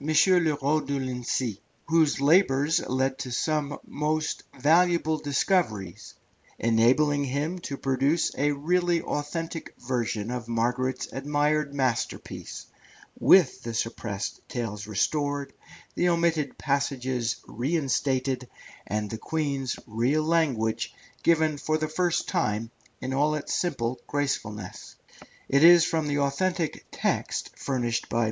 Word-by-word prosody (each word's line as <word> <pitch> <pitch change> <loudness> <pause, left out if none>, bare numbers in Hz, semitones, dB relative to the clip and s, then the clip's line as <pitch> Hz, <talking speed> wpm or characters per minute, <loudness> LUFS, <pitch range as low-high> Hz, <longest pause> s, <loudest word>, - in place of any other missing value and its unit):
Le 155 +2 0 0.5
Roux 150 +2 +1
de 140 0 -2
Lincy, 125 -4 -2 0.3
whose 160 -4 +3
labours 145 -1 +4
led 130 +1 0
to 130 - -4
some 145 +3 -1
most 155 +1 -1 0.2
valuable 160 +1 +3
discoveries, 140 - -1 0.4
enabling 130 +6 +3
him 145 +7 -2
to 140 -5 -5
produce 135 +5 +1
a 145 +2 +2
really 170 +4 +1
authentic 165 +3 -4
version 115 -3 -2
of 125 -2 -4
Margaret's 125 +3 -1
admired 145 +1 0
masterpiece, 130 -4 -3 0.5
with 180 -8 +5
the 115 -1 -5
suppressed 110 -3 -3
tales 105 -4 -4
restored, 145 +7 -1 0.4
the 175 - +2
omitted 170 -4 +1
passages 130 -4 -1
reinstated, 130 -1 -1 0.4
and 105 0 -1
the 110 +1 -6
Queen's 140 -3 -2
real 125 +8 +1
language 145 -9 0 0.3
given 160 -3 +2
for 155 +2 0
the 155 0 -1
first 175 +2 0
time 110 +2 -1 0.3
in 130 +1 -3
all 150 +3 +2
its 150 - -3
simple 130 -8 -1
gracefulness. 110 -9 -3 0.5
It 140 +2 +3
is 170 0 +9
from 160 -2 0
the 145 0 0
authentic 165 +4 -1
text - - -1
furnished 120 -4 -2
by 115 - -1
M. - - +3
140 Hz, 120 wpm, -27 LUFS, 125-155 Hz, 0.5 s, is